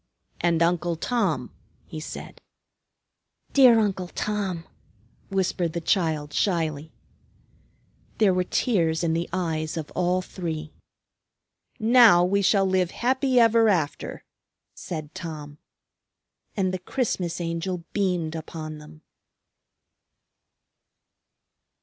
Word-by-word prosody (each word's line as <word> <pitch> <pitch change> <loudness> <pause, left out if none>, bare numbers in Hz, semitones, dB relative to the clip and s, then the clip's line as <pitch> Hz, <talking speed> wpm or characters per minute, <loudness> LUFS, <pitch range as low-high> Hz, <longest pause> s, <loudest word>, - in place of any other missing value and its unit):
"And 170 -1 +2
Uncle 170 0 +1
Tom," 165 - -1 0.3
he 155 - -7
said. 155 - -8 1.1
"Dear 255 -4 +7
Uncle 195 -4 0
Tom!" 195 -3 -3 0.7
whispered 180 -3 -1
the 170 - -2
child 160 -4 0
shyly. 160 -5 -1 1.3
There 205 -4 +4
were 180 0 +1
tears 170 -8 +1
in 165 -1 +1
the 170 +1 -2
eyes 160 -3 -2
of 155 -2 -5
all 180 +1 0
three. 160 -5 -5 1.1
"Now 225 -6 +6
we 200 +2 +1
shall 195 0 +3
live 185 -2 +1
happy 260 +3 +1
ever 230 -1 +5
after," 165 -7 -1 0.5
said 155 -3 -7
Tom. 155 -5 -8 1.0
And 185 -2 +1
the 185 - -2
Christmas 185 -5 -2
Angel 170 +1 -3
beamed 180 -6 0
upon 155 -1 -7
them. 155 +1 -15
175 Hz, 100 wpm, -25 LUFS, 160-195 Hz, 1.3 s, Dear